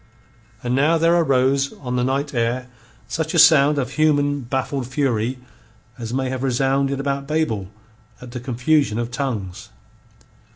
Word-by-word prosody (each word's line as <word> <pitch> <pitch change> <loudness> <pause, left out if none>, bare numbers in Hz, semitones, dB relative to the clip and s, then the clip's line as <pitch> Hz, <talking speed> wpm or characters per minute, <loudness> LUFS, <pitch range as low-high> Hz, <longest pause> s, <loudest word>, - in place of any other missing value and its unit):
And 120 0 -1
now 150 +6 +3
there 165 +1 +3
arose 135 -3 +2
on 125 -3 -5
the 125 - +1
night 140 +3 -1
air 120 +1 -1 0.4
such 160 +6 -3
a - - +2
sound 150 -1 +6
of 135 -3 -2
human 145 -2 +2
baffled 130 +1 -3
fury 130 -3 -1 0.6
as 115 -1 -5
may 130 +1 -1
have 130 -1 -4
resounded 135 +1 0
about 140 0 -2
Babel 145 -11 -1 0.5
at 125 -1 -11
the 125 - -5
confusion 125 0 +1
of 120 0 -3
tongues. 115 -9 -4
135 Hz, 150 wpm, -21 LUFS, 125-145 Hz, 0.6 s, sound